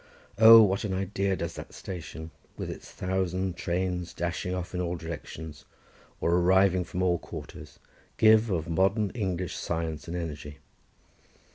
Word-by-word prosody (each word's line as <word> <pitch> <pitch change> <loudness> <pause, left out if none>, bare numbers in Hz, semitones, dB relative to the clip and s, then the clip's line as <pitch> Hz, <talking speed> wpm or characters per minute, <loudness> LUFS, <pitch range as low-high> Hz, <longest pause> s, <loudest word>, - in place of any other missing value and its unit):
Oh, 115 0 +10
what 95 -1 +1
an 100 -3 -2
idea 95 0 -1
does 85 -2 -4
that - - -9
station, 80 -3 -7 0.3
with - - -4
its - - -10
thousand 95 0 -2
trains 90 0 -2
dashing 85 +1 -3
off 90 0 -5
in 90 - -1
all 90 0 -2
directions, 80 -2 -8 0.6
or 85 - +1
arriving 95 +1 +4
from 90 +1 -3
all 90 -2 +2
quarters, - - -10 0.4
give 110 +1 +5
of 85 -5 -1
modern 95 +5 +1
English 95 -6 -3
science 80 -3 -3
and 85 +1 -4
energy. 75 -3 -6
90 Hz, 145 wpm, -28 LUFS, 85-95 Hz, 0.6 s, Oh